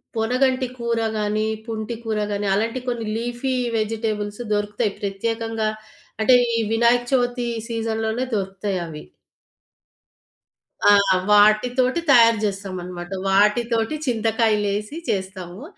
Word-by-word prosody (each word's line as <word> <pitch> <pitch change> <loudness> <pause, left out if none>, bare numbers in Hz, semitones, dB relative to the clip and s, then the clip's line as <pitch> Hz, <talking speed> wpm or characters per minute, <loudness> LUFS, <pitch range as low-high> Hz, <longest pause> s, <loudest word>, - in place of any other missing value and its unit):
పొనగంటి 255 +3 +1
కూర 235 -1 -1 0.2
గానీ, 215 +1 0 0.2
పుంటి 220 +1 -4
కూర 215 -1 -1
గానీ 205 0 -2
అలాంటి 230 +5 0
కొన్ని 235 -2 -2
లీఫీ 240 +3 -2 0.2
వెజిటబుల్స్ 215 0 -2
దొరుకుతాయి. 205 0 -1
ప్రత్యేకంగా 225 +2 -2 0.5
అంటే 255 +3 +5 0.2
ఈ - - +1
వినాయక 235 +1 +3
చవితి 245 -1 +1 0.2
సీజన్‌లోనే 225 +1 -2
దొరుకుతయి 195 0 -2
అవి. 150 -1 -8 1.8
ఆ! - - +8 0.4
వాటితోటి 245 +8 +4
తయారు 230 -3 +7
జేస్తామన్నమాట. 185 -3 -4 0.2
వాటితోటి 225 +6 +2
చింతకాయలేసి 220 +1 0
చేస్తాము. 190 +2 -4
220 Hz, 100 wpm, -22 LUFS, 205-235 Hz, 1.8 s, ఆ